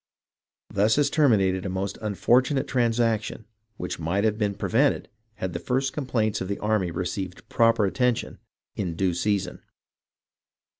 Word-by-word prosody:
Thus 105 Hz, +3 st, +3 dB
has 145 Hz, -1 st, +2 dB
terminated 100 Hz, -, +3 dB
a 95 Hz, -, -3 dB
most 95 Hz, +2 st, -3 dB
unfortunate 125 Hz, +6 st, +2 dB
transaction 115 Hz, -3 st, 0 dB, 0.3 s
which 90 Hz, -, -5 dB
might 85 Hz, +5 st, 0 dB
have 110 Hz, -1 st, +2 dB
been 105 Hz, -2 st, -1 dB
prevented -, -, +1 dB, 0.3 s
had 95 Hz, -5 st, -4 dB
the -, -, -3 dB
first 135 Hz, +1 st, -1 dB
complaints 115 Hz, -7 st, -1 dB
of 95 Hz, -, -3 dB
the 100 Hz, -, -2 dB
army 105 Hz, -4 st, 0 dB
received 90 Hz, +2 st, -4 dB
proper 115 Hz, -2 st, +3 dB
attention 125 Hz, +4 st, 0 dB, 0.4 s
in 90 Hz, -5 st, -3 dB
due 90 Hz, 0 st, +1 dB
season. 95 Hz, 0 st, -1 dB
105 Hz, 140 wpm, -25 LUFS, 95-120 Hz, 0.4 s, Thus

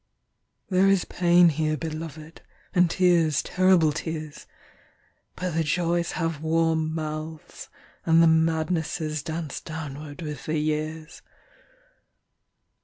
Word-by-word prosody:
There 185 Hz, +1 st, +4 dB
is 195 Hz, -2 st, +2 dB
pain 175 Hz, 0 st, +4 dB
here, 155 Hz, 0 st, -1 dB
beloved, 160 Hz, 0 st, -7 dB, 0.3 s
And 180 Hz, -1 st, +4 dB
tears, 165 Hz, -5 st, +2 dB
terrible 185 Hz, -4 st, +3 dB
tears; 155 Hz, -1 st, -6 dB, 0.9 s
But 180 Hz, 0 st, -3 dB
the 165 Hz, +1 st, +1 dB
joys 170 Hz, +2 st, 0 dB
have 165 Hz, -3 st, -2 dB
warm 160 Hz, 0 st, +1 dB
mouths, 155 Hz, 0 st, -6 dB, 0.3 s
and 165 Hz, 0 st, +4 dB
the -, -, +6 dB
madnessesDance 160 Hz, -1 st, -1 dB
downward 150 Hz, -1 st, -7 dB
with 150 Hz, -4 st, -7 dB
the 155 Hz, 0 st, 0 dB
years. 155 Hz, +1 st, -3 dB
160 Hz, 105 wpm, -25 LUFS, 155-170 Hz, 0.9 s, the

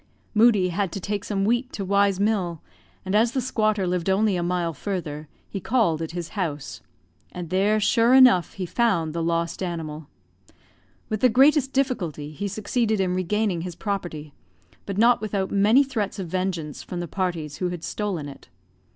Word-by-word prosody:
Moodie 215 Hz, -4 st, +4 dB
had 185 Hz, +1 st, -1 dB
to -, -, -3 dB
take 205 Hz, +1 st, -3 dB
some 200 Hz, -3 st, -1 dB
wheat 240 Hz, +4 st, 0 dB
to 195 Hz, -, -4 dB
Y 200 Hz, +1 st, +3 dB
's 195 Hz, -1 st, -4 dB
mill, 195 Hz, -6 st, 0 dB, 0.5 s
and 190 Hz, -, -3 dB
as 225 Hz, +3 st, +3 dB
the 270 Hz, -, 0 dB
squatter 215 Hz, -5 st, 0 dB
lived 180 Hz, 0 st, -1 dB
only 200 Hz, +1 st, +2 dB
a 175 Hz, -, -1 dB
mile 175 Hz, -1 st, -1 dB
further, 155 Hz, -3 st, -5 dB, 0.2 s
he 195 Hz, -, -5 dB
called 190 Hz, -7 st, +1 dB
at 160 Hz, -, -3 dB
his 170 Hz, -1 st, -5 dB
house; 160 Hz, -9 st, -4 dB, 0.5 s
and 175 Hz, -2 st, -7 dB
there, 205 Hz, +3 st, +2 dB
sure 230 Hz, +4 st, +4 dB
enough, 250 Hz, -, +6 dB
he 190 Hz, -, -4 dB
found 175 Hz, -7 st, +1 dB
the 170 Hz, -, -2 dB
lost 170 Hz, +1 st, -1 dB
animal. 160 Hz, -4 st, -5 dB, 1.0 s
With 215 Hz, -, -2 dB
the 255 Hz, -, +5 dB
greatest 270 Hz, +3 st, +4 dB
difficulty 180 Hz, -, -1 dB
he 200 Hz, +7 st, -4 dB
succeeded 215 Hz, +2 st, -1 dB
in 185 Hz, -2 st, +1 dB
regaining 185 Hz, 0 st, 0 dB
his 175 Hz, -1 st, -6 dB
property, 175 Hz, -8 st, -4 dB, 0.5 s
but 200 Hz, -1 st, -4 dB
not 235 Hz, +1 st, +4 dB
without 200 Hz, -3 st, -2 dB
many 210 Hz, +7 st, +5 dB
threats 225 Hz, -7 st, -3 dB
of 190 Hz, -3 st, -4 dB
vengeance 175 Hz, -4 st, -3 dB
from 180 Hz, -, -6 dB
the 175 Hz, -, -4 dB
parties 165 Hz, -4 st, -3 dB
who 180 Hz, -, -1 dB
had 175 Hz, -2 st, -6 dB
stolen 190 Hz, -8 st, -3 dB
it. 140 Hz, -, -12 dB
190 Hz, 180 wpm, -24 LUFS, 170-215 Hz, 1.0 s, enough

